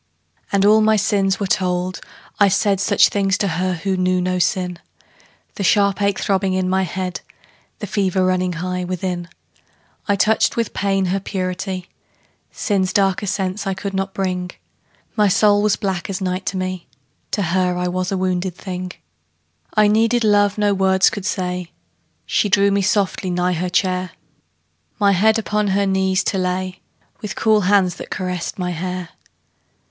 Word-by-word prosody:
And 200 0 +2
all 215 +1 +6
my 220 0 +4
sins 200 -2 +1
were 200 - -1
told; 185 -1 -1 0.4
I 205 - +6
said 195 0 +2
Such 195 - +4
things 195 -1 +1
to 200 - 0
her 185 +1 -1
who 190 +3 -2
knew 185 0 +1
not 180 0 0
sin 180 -2 -1 0.8
The 200 - -2
sharp 200 +1 +3
ache 200 -1 +1
throbbing 195 -1 0
in 185 -1 0
my 190 +1 +1
head, 185 0 -3 0.6
The - - -5
fever 190 -2 0
running 185 -1 +1
high 180 +2 -3
within. 180 -1 -3 0.8
I 200 - +3
touched 215 +4 +2
with 230 -2 -1
pain 195 -1 0
her 195 - 0
purity; 185 -1 -4 0.6
Sin's 190 -4 -1
darker 200 0 +1
sense 195 +1 -2
I 195 - -1
could 195 +1 -5
not 195 0 -3
bring: 180 -2 -2 0.7
My 210 -2 +4
soul 205 +1 +4
was 210 -1 +2
black 190 -3 -3
as 190 - -3
night 185 0 -3
to 190 - -1
me: 185 -1 -4 0.4
To 205 - -1
her 180 +1 0
I 180 0 -1
was 185 +1 -2
a 195 - 0
wounded 185 -1 -1
thing. 180 -1 -6 0.8
I 215 -1 +5
needed 225 +3 +2
love 205 -1 +3
no 205 -1 +2
words 190 -1 +3
could 205 -1 -4
say; 180 -2 -3 0.6
She 205 - +1
drew 200 0 +4
me 200 0 +2
softly 190 -1 0
nigh 180 0 0
her 180 +2 -2
chair, 185 +1 0 0.9
My 200 -1 +4
head 215 +4 +3
upon 210 -1 -1
her 200 +1 +1
knees 190 -1 +1
to 195 - -1
lay, 185 0 -2 0.4
With 205 -6 -5
cool 215 -1 +3
hands 190 -2 +2
that - - -8
caressed 180 -3 -4
my 180 -1 -2
hair. 180 +1 -4
190 Hz, 170 wpm, -20 LUFS, 180-200 Hz, 0.9 s, all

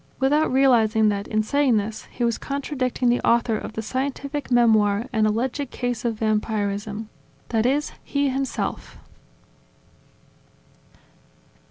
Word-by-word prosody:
without 295 +4 +2
realizing 225 -5 +4
that, 200 -1 -2
in 215 0 0
saying 275 0 +2
this, 215 +1 -4
he 245 - -5
was 235 -1 0
contradicting 270 -3 -2
the 240 - +2
author 235 -1 +2
of 215 - -5
the 220 - -4
scientific 280 +4 -3
memoir 220 -3 +3
An 215 -1 +3
Alleged 250 +5 -1
Case 245 -2 -3
of 230 -2 0
Vampirism, 210 -1 -2 0.4
that 225 0 +1
is, 290 +3 0
he 280 0 0
himself. 270 +1 -3
235 Hz, 125 wpm, -23 LUFS, 215-265 Hz, 0.4 s, realizing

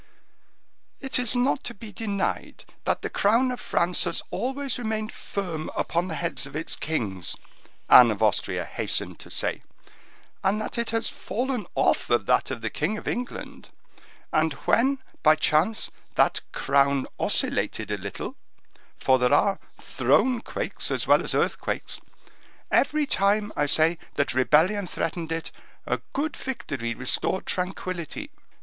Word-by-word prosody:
"It 265 -1 0
is 250 -1 +1
not 250 +2 +2
to 240 - -5
be 215 +1 -10
denied 200 -1 -3 0.2
that - - 0
the - - -2
crown 235 +6 +3
of 250 - -4
France 175 +1 +1
has - - -1
always 270 0 -2
remained 220 -2 -2
firm 175 -6 -4
upon 170 +2 0
the 165 - -4
heads 145 - -2
of 135 - -12
its 155 +2 -2
kings," 100 - -3 0.5
Anne 125 -2 +9
of 110 0 -1
Austria 105 -4 +1
hastened - - -1
to - - -11
say, - - -2 0.8
"and 195 +2 +2
that 215 - -3
it 235 - -1
has 225 +1 0
fallen 245 -4 -3
off - - +2
of 120 - +2
that 125 - +2
of 130 -3 -4
the 115 - -2
king 185 +9 -1
of - - -9
England; 245 0 -5 0.6
and 155 -1 +3
when 270 +4 +3 0.2
by 155 0 +6
chance 160 +8 +2 0.2
that - - +3
crown 140 0 +2
oscillated - - 0
a - - 0
little,—for 130 0 -3
there 125 0 +3
are 200 -1 +3 0.2
throne 250 -3 +2
quakes - - -4
as - - -1
well - - +5
as - - -2
earthquakes,—every 300 0 -2
time, 205 -3 +2
I 145 - +1
say, 160 +3 +4 0.2
that 140 - +1
rebellion 165 +10 +3
threatened 165 -1 -3
it, 165 0 -3 0.3
a - - -1
good 295 +3 -1
victory 135 - -4
restored 130 +9 0
tranquillity." 185 - -3
185 Hz, 145 wpm, -26 LUFS, 150-230 Hz, 0.8 s, Anne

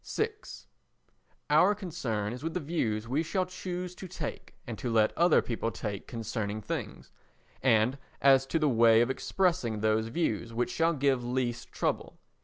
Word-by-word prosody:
vi 440 - +2 1.2
Our 180 +7 +5
concern 125 - -3
is 125 +3 -8
with 165 +1 -3
the - - +1
views 115 -9 -1
we 135 +6 +1
shall 185 +3 0
choose 180 0 -5
to 185 - -9
take 165 -4 -6
and 120 -4 -5
to 120 - -2
let 110 -1 +3
other 175 +1 +4
people 115 -1 -2
take 105 -3 -5
concerning 110 -2 -3
things, 105 - -5 0.5
and 125 +1 +3 0.2
as 135 -1 +5
to 165 - 0
the 155 -1 +2
way 115 -3 +5
of 120 +2 +2
expressing 130 - 0
those 110 +1 +2
views 115 - -2
which 120 +1 0
shall 165 +1 +2
give 135 -3 +1
least 120 -1 -2
trouble. - - -2
125 Hz, 165 wpm, -30 LUFS, 115-165 Hz, 1.2 s, Our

